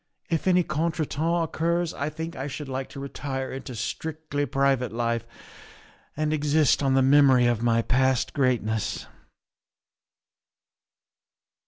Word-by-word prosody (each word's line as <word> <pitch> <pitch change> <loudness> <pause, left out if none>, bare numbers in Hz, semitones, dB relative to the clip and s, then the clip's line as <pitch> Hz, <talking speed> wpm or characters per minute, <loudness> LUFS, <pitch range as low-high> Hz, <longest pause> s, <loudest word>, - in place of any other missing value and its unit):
If 165 +2 0
any 180 -1 +4
contretemps 160 +1 -1
occurs 170 +1 -1
I 140 +2 -3
think 160 +2 -6
I 135 +2 -4
should 145 +1 -6
like 130 0 -4
to - - -9
retire 135 -1 -4
into 130 -1 -7
strictly 145 +4 -3
private 135 -3 +1
life 115 0 -1 0.9
and 155 0 0
exist 150 -1 +2
on 135 -2 +2
the 135 - +4
memory 135 -2 +5
of 120 -2 +1
my 115 -1 +2
past 130 0 +1
greatness. 115 -5 0
140 Hz, 125 wpm, -26 LUFS, 130-155 Hz, 0.9 s, memory